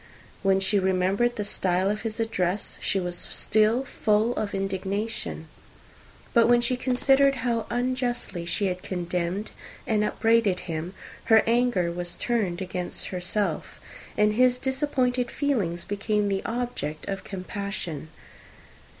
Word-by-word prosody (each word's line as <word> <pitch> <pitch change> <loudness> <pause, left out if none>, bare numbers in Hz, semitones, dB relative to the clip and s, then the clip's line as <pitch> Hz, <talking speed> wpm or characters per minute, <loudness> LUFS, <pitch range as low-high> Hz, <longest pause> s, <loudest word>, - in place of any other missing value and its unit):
When 195 -1 +3
she 195 +2 +2
remembered 190 +5 +2
the 210 - -2
style 190 -1 +1
of 210 - -3
his 225 -1 -4
address, 200 -3 -1
she 195 - +1
was 180 -1 -3
still 215 +7 +1
full 220 -2 +1
of 205 -2 -2
indignation: 195 -2 -3 0.9
but 230 -1 +6
when 240 0 +6
she 240 +1 +1
considered 270 +2 +3
how 230 -2 0
unjustly 245 -6 -1
she 175 +4 -1
had 185 -1 -1
condemned 180 +2 -2 0.3
and 215 -2 +2
upbraided 225 -4 +2
him, 170 +2 -5 0.3
her 220 -1 +6
anger 230 -7 +2
was 175 0 -4
turned 200 -7 -1
against 180 -1 -3
herself; 185 +3 -2 0.4
and 210 0 +4
his 250 +2 +4
disappointed 260 -2 0
feelings 205 - -1
became 205 0 0
the 195 -1 0
object 230 -11 -3
of 195 -1 -3
compassion. 185 -5 -5
210 Hz, 130 wpm, -26 LUFS, 185-240 Hz, 0.9 s, but